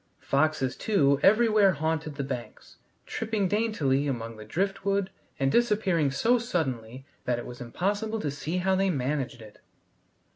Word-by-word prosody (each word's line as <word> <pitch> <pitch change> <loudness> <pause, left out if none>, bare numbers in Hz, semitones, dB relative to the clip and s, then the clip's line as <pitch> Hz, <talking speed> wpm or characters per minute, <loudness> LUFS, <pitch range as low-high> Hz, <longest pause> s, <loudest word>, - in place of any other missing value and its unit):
Foxes, 140 -2 +1
too, 140 -11 +2
everywhere 215 -2 +5
haunted 160 0 -2
the 140 - -3
banks, 125 -5 -7 0.3
tripping 220 -3 -1
daintily 170 -10 +1
among 115 -4 -3
the 110 - -10
driftwood 195 - -1 0.3
and 135 -1 +2
disappearing 210 -10 +2
so 230 - +2
suddenly 135 - -3 0.2
that 125 -1 +1
it 120 - -6
was 125 0 -9
impossible 205 - -2
to 150 -8 -2
see 155 +5 -3
how 190 +1 +1
they 195 +1 +2
managed 135 -5 -2
it. 105 -1 -15
155 Hz, 145 wpm, -27 LUFS, 135-200 Hz, 0.3 s, everywhere